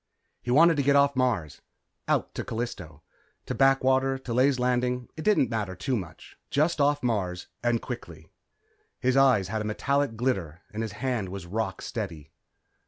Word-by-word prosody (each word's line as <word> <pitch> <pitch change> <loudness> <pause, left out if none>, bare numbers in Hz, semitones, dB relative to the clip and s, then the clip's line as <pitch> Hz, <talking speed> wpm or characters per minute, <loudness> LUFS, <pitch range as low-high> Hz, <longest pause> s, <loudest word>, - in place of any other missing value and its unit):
He - - -7
wanted 160 +5 +6
to - - +3
get 140 +1 +3
off 140 0 +4
Mars 115 - 0 0.5
out - - 0
to - - -4
Callisto. 90 - -5 0.4
To - - -3
Blackwater, 135 0 +3
to 130 -3 -6
Ley's 130 +2 +3
Landing, 125 0 0
it 155 - -6
didn't 210 -12 +3
matter 105 -5 -2
too 130 +5 -1
much. 90 -7 -8
Just 155 +2 +1
off 145 0 +2
Mars, 95 -7 -2
and 120 -1 0
quickly. 85 - -8 0.7
His 130 0 +1
eyes 130 -9 +4
had 110 +1 -2
a - - -2
metallic 135 +4 0
glitter 95 -9 -2
and 110 - -3
his 110 -3 -4
hand 110 -3 -2
was 95 -1 -7
rock 95 +1 -3
steady. 85 -10 -5
120 Hz, 170 wpm, -27 LUFS, 100-135 Hz, 0.7 s, wanted